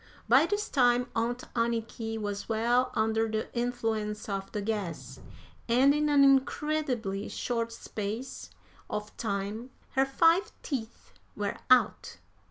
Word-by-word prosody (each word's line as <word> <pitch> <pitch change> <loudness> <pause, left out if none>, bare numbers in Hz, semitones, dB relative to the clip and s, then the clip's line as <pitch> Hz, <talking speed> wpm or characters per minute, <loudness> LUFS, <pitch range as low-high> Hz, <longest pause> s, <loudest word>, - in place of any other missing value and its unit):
By - - +6
this 415 0 -1
time 245 -2 +3
Aunt 240 +2 -1
Anniky 225 -1 -1
was 205 0 -4
well 235 +3 +2
under 220 +1 +1
the 220 +2 -3
influence 225 -3 -2
of 195 -2 -4
the 210 - -3
gas, 205 -4 -4 0.5
and 260 +4 +5
in 300 0 +1
an 285 -1 +5
incredibly 270 -6 +1
short 230 -1 -2
space 225 +2 -5 0.4
of 210 0 -5
time 205 +3 -3 0.2
her 265 - +3
five 335 +9 +3
teeth 235 -6 -5 0.2
were 205 -1 -2
out. 255 -1 +3
230 Hz, 125 wpm, -29 LUFS, 215-260 Hz, 0.5 s, By